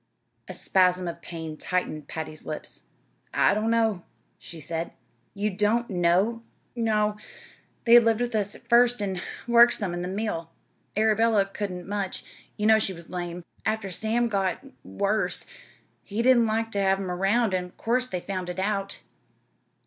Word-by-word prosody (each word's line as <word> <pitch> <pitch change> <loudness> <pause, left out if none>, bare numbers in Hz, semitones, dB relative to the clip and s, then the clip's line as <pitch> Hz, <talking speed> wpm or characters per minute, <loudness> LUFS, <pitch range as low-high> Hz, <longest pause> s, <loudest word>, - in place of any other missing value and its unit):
A - - -6
spasm 180 -1 +2
of 170 0 -6
pain 160 -3 -7
tightened 155 -5 -2
Patty's 155 -1 -6
lips. 155 - -7 0.5
"I - - +4
don't 215 +2 0
know," 225 -5 +2 0.4
she 165 - -9
said. 165 +2 -4 0.4
"You 210 +1 -1
don't 210 +4 +1
know!" 185 +6 +2 0.3
"No. 215 -3 +1 0.7
They 235 0 +9
lived 230 -1 +2
with 245 0 -1
us 205 -2 0
at 235 - -16
first, 245 0 +5
an' 190 -3 -2 0.3
worked 235 0 +7
some 195 -5 -2
in 175 - -3
the 180 - -3
mill. 185 -4 -3 0.5
Arabella 220 -1 +3
couldn't 195 -3 -5
much; 200 -2 -2 0.3
you 210 - -1
know 220 0 +6
she 195 -3 -1
was 170 -1 -12
lame. 175 -1 -4 0.2
After 220 -3 -1
Sam 225 +5 0
got 195 +1 -1 0.2
worse, 200 +2 -1 0.6
he 215 +3 -3
didn't 240 -2 +5
like 225 +1 -1
ter 200 - 0
have 195 0 +3
'em 190 -2 -3
'round, 195 +4 +2
an' 180 -1 -1
'course 250 +2 +1
they 180 -6 -4
found 185 -2 -4
it 180 - -5
out. 195 0 -2
200 Hz, 160 wpm, -26 LUFS, 180-225 Hz, 0.7 s, They